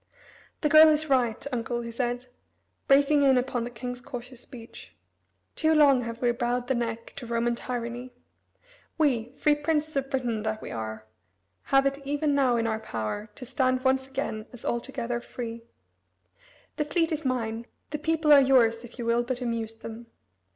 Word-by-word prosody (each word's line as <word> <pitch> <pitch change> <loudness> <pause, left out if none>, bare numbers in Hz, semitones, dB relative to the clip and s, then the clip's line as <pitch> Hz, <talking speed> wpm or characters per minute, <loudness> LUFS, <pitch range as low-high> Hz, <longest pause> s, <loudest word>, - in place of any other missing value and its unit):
"The 300 - +3
girl 310 +1 +9
is 310 -1 +1
right, 245 -3 +2
uncle," 240 0 -2
he 235 0 -6
said, 245 +1 -2 0.6
breaking 285 +1 +5
in 270 -2 +5
upon 250 -2 -1
the - - -4
king's 245 +1 -6
cautious 245 0 -8
speech. 235 -3 -12 0.6
"Too 315 0 +2
long 280 -4 +6
have 230 +1 -6
we 240 - +4
bowed 240 +1 -1
the 265 - +2
neck 230 -2 -3
to 245 - -7
Roman 235 +1 +1
tyranny. 245 +1 -5 0.9
We, 250 -7 +1
free 300 - +4
princes 300 +1 -1
of 270 -1 -1
Britain 245 -5 -1
that 220 0 -2
we - - -8
are, 110 -1 -5 0.6
have 270 0 +4
it 275 0 0
even 290 +1 0
now 265 -3 +3
in 230 -1 0
our 220 -1 -1
power 205 - -4
to 255 - -8
stand 255 0 0
once 265 0 +2
again 265 -5 -4
as 245 - -12
altogether 240 0 -2
free. 230 -1 -7 1.1
The 300 - 0
fleet 330 +2 +1
is 315 0 -2
mine, 235 -3 -2 0.2
the 300 - -3
people 315 0 +3
are 280 - +9
yours, 240 -4 +4
if 240 +1 -12
you 240 - -4
will 235 +1 +3
but 245 +1 -3
amuse 230 -2 -3
them. 225 +1 -9
245 Hz, 175 wpm, -27 LUFS, 230-275 Hz, 1.1 s, girl